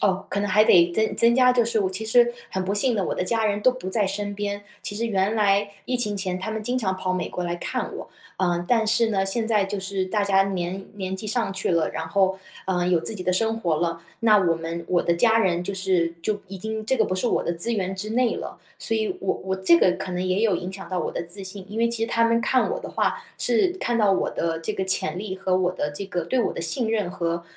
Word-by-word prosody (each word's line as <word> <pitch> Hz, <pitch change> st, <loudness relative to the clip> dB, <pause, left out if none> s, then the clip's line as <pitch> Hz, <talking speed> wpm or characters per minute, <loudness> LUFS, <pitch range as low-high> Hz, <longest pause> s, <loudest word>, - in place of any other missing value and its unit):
哦， 195 Hz, -1 st, +1 dB
可 200 Hz, -, -1 dB
能 205 Hz, 0 st, 0 dB
还 210 Hz, +3 st, +5 dB
得 175 Hz, -3 st, +5 dB
增 220 Hz, +3 st, 0 dB
增 235 Hz, 0 st, +5 dB
加， 250 Hz, -1 st, +5 dB
就 240 Hz, -2 st, +3 dB
是 225 Hz, -2 st, 0 dB
我 190 Hz, -1 st, 0 dB
其 215 Hz, +4 st, -5 dB
实 240 Hz, +1 st, +4 dB, 0.2 s
很 190 Hz, -1 st, -2 dB
不 195 Hz, -, -1 dB
幸 235 Hz, +4 st, +2 dB
的， 200 Hz, -3 st, 0 dB
我 -, -, -2 dB
的 180 Hz, -, -1 dB
家 225 Hz, +3 st, 0 dB
人 205 Hz, -1 st, +1 dB
都 255 Hz, -, +5 dB
不 220 Hz, -7 st, -6 dB
在 205 Hz, -1 st, +1 dB
身 205 Hz, +1 st, -3 dB
边， 205 Hz, 0 st, -3 dB, 0.2 s
其 205 Hz, -, -6 dB
实 225 Hz, +3 st, -2 dB
原 200 Hz, -1 st, +1 dB
来 205 Hz, -1 st, +3 dB, 0.2 s
疫 250 Hz, -, 0 dB
情 210 Hz, -4 st, -1 dB
前， 185 Hz, -2 st, -2 dB
他 220 Hz, +4 st, -4 dB
们 220 Hz, -1 st, -3 dB
经 250 Hz, +3 st, -1 dB
常 190 Hz, -5 st, 0 dB
跑 185 Hz, 0 st, -2 dB
美 185 Hz, -, -2 dB
国 180 Hz, -, -4 dB
来 175 Hz, 0 st, -2 dB
看 -, -, -3 dB
我。 -, -, -8 dB, 0.3 s
呃， 175 Hz, -2 st, 0 dB
但 225 Hz, -3 st, +3 dB
是 230 Hz, +1 st, +3 dB
呢， 195 Hz, -2 st, 0 dB
现 225 Hz, +3 st, -1 dB
在 210 Hz, -3 st, +3 dB
就 195 Hz, 0 st, -4 dB
是 195 Hz, 0 st, -2 dB
大 205 Hz, +3 st, 0 dB
家 195 Hz, -1 st, +4 dB
年 185 Hz, +1 st, -3 dB
年 190 Hz, -2 st, -4 dB
纪 215 Hz, +3 st, -7 dB
上 225 Hz, -3 st, -1 dB
去 190 Hz, -1 st, -1 dB
了， 165 Hz, -2 st, +2 dB
然 160 Hz, 0 st, -4 dB
后， 190 Hz, +2 st, +2 dB, 0.3 s
呃， 180 Hz, -2 st, 0 dB
有 175 Hz, -2 st, +3 dB
自 225 Hz, -, 0 dB
己 185 Hz, -4 st, -6 dB
的 185 Hz, -, +2 dB
生 225 Hz, +4 st, +1 dB
活 170 Hz, -7 st, 0 dB
了， 165 Hz, 0 st, -1 dB, 0.2 s
那 220 Hz, -2 st, +5 dB
我 175 Hz, -4 st, +2 dB
们 165 Hz, +1 st, -5 dB
我 175 Hz, -1 st, +2 dB
的 170 Hz, -, +2 dB
家 225 Hz, +5 st, +4 dB
人 180 Hz, -4 st, +1 dB
就 200 Hz, +1 st, -3 dB
是 185 Hz, -3 st, +1 dB
就 205 Hz, +3 st, -1 dB
已 195 Hz, +1 st, -8 dB
经 220 Hz, +3 st, -4 dB
这 265 Hz, -, +2 dB
个 -, -, +3 dB
不 185 Hz, -, -2 dB
是 185 Hz, +6 st, 0 dB
我 -, -, +1 dB
的 170 Hz, -, -2 dB
资 175 Hz, +8 st, 0 dB
源 190 Hz, -3 st, -2 dB
之 210 Hz, +3 st, -5 dB
内 240 Hz, +1 st, +2 dB
了。 -, -, -7 dB, 0.2 s
所 225 Hz, -, 0 dB
以， 220 Hz, -1 st, 0 dB
我 195 Hz, -, 0 dB
我 190 Hz, 0 st, -2 dB
这 190 Hz, -3 st, +5 dB
个 180 Hz, -, +5 dB
可 185 Hz, -, -5 dB
能 180 Hz, -, -2 dB
也 185 Hz, +4 st, +1 dB
有 215 Hz, -4 st, +3 dB
影 180 Hz, +1 st, -3 dB
响 190 Hz, -, -9 dB
到 185 Hz, -1 st, -2 dB
我 -, -, -2 dB
的 -, -, -3 dB
自 190 Hz, +4 st, -10 dB
信。 190 Hz, 0 st, -8 dB
因 215 Hz, -, -6 dB
为 235 Hz, 0 st, +3 dB
其 230 Hz, -1 st, -1 dB
实 230 Hz, -, -6 dB
他 230 Hz, 0 st, +2 dB
们 230 Hz, 0 st, +3 dB
看 260 Hz, -, +2 dB
我 -, -, -2 dB
的 -, -, -7 dB
话， 475 Hz, -1 st, -1 dB
是 385 Hz, -4 st, +2 dB
看 240 Hz, -1 st, 0 dB
到 205 Hz, -3 st, +4 dB
我 185 Hz, -, 0 dB
的 165 Hz, -1 st, -2 dB
这 165 Hz, -, -3 dB
个 190 Hz, -, -2 dB
潜 180 Hz, -3 st, 0 dB
力， 195 Hz, -2 st, -4 dB
和 190 Hz, -1 st, 0 dB
我 180 Hz, -1 st, +1 dB
的 150 Hz, -5 st, -2 dB
这 145 Hz, +7 st, -6 dB
个 180 Hz, -3 st, -2 dB
对 260 Hz, -, 0 dB
我 -, -, 0 dB
的 -, -, -5 dB
信 220 Hz, +8 st, -2 dB
任 210 Hz, -5 st, 0 dB
和 170 Hz, -1 st, -2 dB
195 Hz, 305 characters per minute, -24 LUFS, 185-220 Hz, 0.3 s, 还